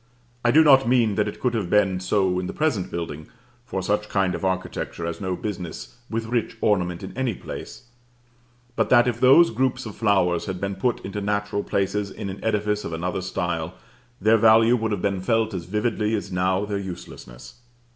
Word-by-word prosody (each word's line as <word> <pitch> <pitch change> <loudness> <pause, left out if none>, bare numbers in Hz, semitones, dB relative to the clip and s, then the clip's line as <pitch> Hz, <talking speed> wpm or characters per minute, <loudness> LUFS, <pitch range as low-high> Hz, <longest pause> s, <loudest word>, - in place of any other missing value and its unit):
I 120 - +3
do 155 +6 +6
not 135 -4 +6
mean 120 -4 +3
that 105 0 0
it 105 - -6
could 125 -2 0
have 105 -6 -2
been 95 -2 +3
so 90 -1 +1
in 90 - -3
the - - -5
present 135 - 0
building, 80 -3 -5 0.4
for 95 -5 -3
such 105 +2 -1
kind 95 -2 +1
of - - -5
architecture 95 -2 -3
has 85 +4 -5
no 95 -2 -2
business 95 +2 -6
with 115 0 -2
rich 115 0 -2
ornament 90 -5 0
in - - -8
any 130 -5 -1
place; - - -8 0.9
but - - +1
that 120 -1 +5
if 120 -1 -1
those 135 +6 +6
groups 130 +2 -1
of 110 - -7
flowers 95 -5 +1
had 95 -2 -4
been 100 +1 -2
put 120 +5 -1
into 100 +1 -4
natural 105 0 -1
places 100 +1 -1
in 100 0 -6
an 95 - -10
edifice 105 -1 0
of 80 - -5
another 90 +3 -2
style, 85 -2 -3 0.4
their 110 +3 +4
value 115 +2 +5
would 110 -2 -1
have 100 -3 -2
been 100 -2 0
felt 110 +1 +1
as 90 -3 -4
vividly 105 +2 0
as 100 -2 -5
now 95 +2 +1
their 100 -1 -3
uselessness. 90 - -9
105 Hz, 195 wpm, -24 LUFS, 95-115 Hz, 0.9 s, do